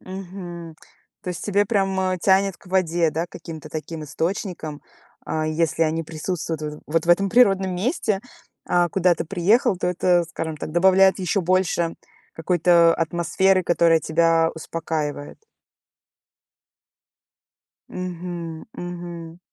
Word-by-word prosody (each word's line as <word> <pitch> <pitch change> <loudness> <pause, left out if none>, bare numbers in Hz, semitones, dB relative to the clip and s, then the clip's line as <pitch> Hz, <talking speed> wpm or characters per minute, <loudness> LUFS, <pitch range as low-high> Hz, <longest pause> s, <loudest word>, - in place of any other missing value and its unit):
Мгм. 175 -3 -8 0.5
То 185 - -6
есть 175 - -6
тебе 205 0 +2
прям, 195 -3 0
э, 185 -1 0
тянет 195 0 +3
к - - -22
воде, 175 -3 +1
да, 165 +3 -2
каким-то 160 -3 -9
таким 155 0 -6
источникам. 165 -2 -4 0.4
А 155 0 -2
если 165 +1 0
они 160 +1 0
присутствуют 160 0 -4
в, 150 0 -6
вот 165 +2 0
в - - +4
этом 195 +3 +4
природном 195 -5 +3
месте, 210 - -1 0.5
а 175 -1 +2
куда 180 0 +2
ты 165 - -4
приехал, 200 - +2
то 180 - -2
это, 180 -1 +2
скажем 160 -1 -4
так, 155 - -6
добавляет 190 +3 +5
ещё 190 +2 0
больше 175 -2 +1 0.4
какой-то 170 0 +4
атмосферы, 175 +3 +1
которая 170 -1 +4
тебя 165 +1 +2
успокаивает. 155 -3 -4 2.5
Мгм. 175 -2 -6
Мгм. 175 -1 -7
175 Hz, 125 wpm, -23 LUFS, 165-185 Hz, 2.5 s, добавляет